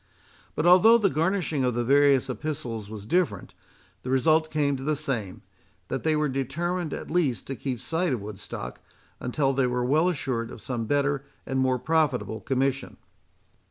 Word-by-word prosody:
But 155 - -1
although 185 +6 +7
the 200 -5 +2
garnishing 165 -3 0
of 125 -2 +1
the 120 - 0
various 140 +1 +4
epistles 125 -5 -4
was 105 -2 -8
different, 180 +7 0 0.5
the 125 - -6
result 155 +4 +3
came 145 -2 +1
to 130 - -7
the 155 +2 +1
same, 125 -10 -4 0.5
that - - -2
they 160 -1 +1
were 150 0 +1
determined 155 +6 -2
at - - -6
least 145 - 0
to 135 - -5
keep 130 -2 -4
sight 165 +4 -1
of 125 - 0
Woodstock, 100 - -7 0.4
until 135 +2 0
they 130 -1 +2
were 125 0 -1
well 155 +7 +3
assured 125 -8 -2
of 120 - -9
some 115 -1 -4
better 145 0 +1 0.2
and 135 0 -1
more 130 -1 +2
profitable 140 -6 0
commission. 135 0 -1
135 Hz, 170 wpm, -26 LUFS, 125-155 Hz, 0.5 s, although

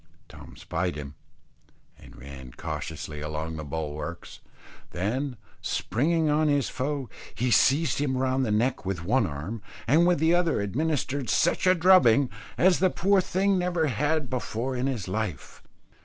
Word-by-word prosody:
Tom - - -13
spied 90 -1 -2
him, 70 -1 -7 0.8
and - - -16
ran 65 -1 -10
cautiously 75 -1 -6
along 75 +1 -4
the 80 - -5
bulwarks, 75 +2 -6 0.5
then 125 +8 -2 0.2
springing 160 +6 0
on 150 +1 +2
his 145 -3 +1
foe, 140 0 -3 0.3
he 125 +1 0
seized 145 +7 +3
him 135 -3 0
round 130 0 +1
the 120 - -1
neck 120 +5 +1
with 95 -3 -4
one 115 +1 +2
arm, 80 +10 -6 0.2
and 160 +8 +4
with 180 - +3
the 160 +3 +3
other 175 -6 +2
administered 140 +4 -1
such 175 +2 +2
a 185 - +6
drubbing, 160 -8 +5 0.3
as 185 0 +4
the 185 - +4
poor 195 +2 +2
thing 190 +1 +1
never 180 -2 0
had 150 +3 0
before 125 0 -3
in 125 +2 -1
his 120 -9 -3
life. 105 -1 -4
130 Hz, 155 wpm, -26 LUFS, -, 0.8 s, a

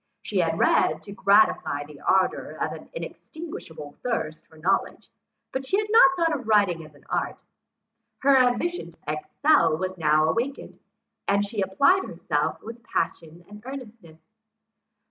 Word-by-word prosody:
She - - -1
had - - +1
read, - - +2
to 200 - -10
gratify 200 -8 +3
the 145 -1 -14
ardour 190 -1 +1
of - - -1
an - - -10
inextinguishable 310 - -8
thirst 195 -11 -3
of 160 - -17
knowledge; 185 +5 -1 0.4
but 265 - -3
she 380 +9 0
had 425 0 -1
not 455 -3 +8
thought 330 -2 +2
of 255 -5 -7
writing 200 -6 +3
as 155 -1 -15
an 145 - -20
art. - - -3 0.8
Her 275 0 +6
ambition 260 +8 +1
to - - -20
excel 290 - +2
was 185 +1 -4
now 155 0 +3
awakened, 240 - -3 0.5
and 200 +1 +2
she 205 0 -3
applied 275 - +3
herself - - -2
with 230 +1 -9
passion 165 -6 -3
and 210 +1 -12
earnestness. 230 -11 -10
210 Hz, 150 wpm, -25 LUFS, 165-275 Hz, 0.8 s, not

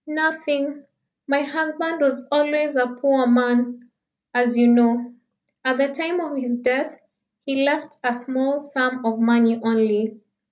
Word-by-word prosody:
"Nothing. 300 -2 -2 0.4
My 280 +1 +1
husband 315 +2 -3
was 265 -2 0
always 295 0 +1
a 250 -1 +2
poor 255 +1 +1
man, 245 0 +1 0.4
as 245 -1 +1
you 240 - +5
know. 240 0 +3 0.5
At 260 0 +1
the 275 +1 +2
time 330 +5 -3
of 315 -4 -5
his 245 -2 -2
death 265 +5 -1 0.5
he 275 0 0
left 295 +1 -1
a 245 -1 0
small 260 +3 -2
sum 255 -4 -2
of 225 0 -1
money 230 0 +3
only. 220 -1 0
265 Hz, 145 wpm, -21 LUFS, 245-295 Hz, 0.5 s, you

